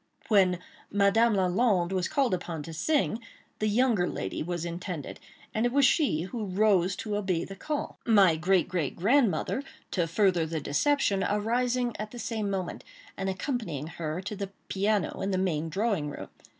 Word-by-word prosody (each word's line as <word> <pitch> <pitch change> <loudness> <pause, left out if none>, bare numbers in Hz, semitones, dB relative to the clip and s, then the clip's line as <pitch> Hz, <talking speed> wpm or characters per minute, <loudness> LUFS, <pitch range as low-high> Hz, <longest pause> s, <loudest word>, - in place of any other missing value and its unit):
When 190 -4 +4 0.3
"Madame 205 +3 +3
Lalande" 190 -1 +2
was 185 -1 0
called 270 -7 +1
upon 165 -4 -3
to 165 - -8
sing, 275 - +1 0.4
the 215 - +1
younger 215 -4 +2
lady 95 - -4
was 175 +1 -3
intended; 170 -2 -5 0.3
and 220 - 0
it 240 - +2
was 280 +1 +4
she 255 - +2
who 210 0 -5
arose 195 -3 +3
to 210 +1 -3
obey 190 -5 -1
the 195 - -9
call; 295 +9 -4
my 200 -7 +5
great, 180 +3 +2
great, 165 -7 -2
grandmother, 225 - +2 0.3
to 175 -3 0
further 175 -2 +2
the 160 0 -2
deception, 200 - +1
arising 240 +3 0
at 215 0 -4
the 240 - -10
same 220 -3 -2
moment 190 -3 -3 0.3
and 195 0 -2
accompanying 190 - -3
her 160 +1 -4
to 205 +2 -5
the 200 -1 -4 0.2
piano 200 0 0
in 195 - -1
the 190 - 0
main 165 -4 0
drawing 195 -4 0
room. - - -8
195 Hz, 170 wpm, -28 LUFS, 175-225 Hz, 0.4 s, my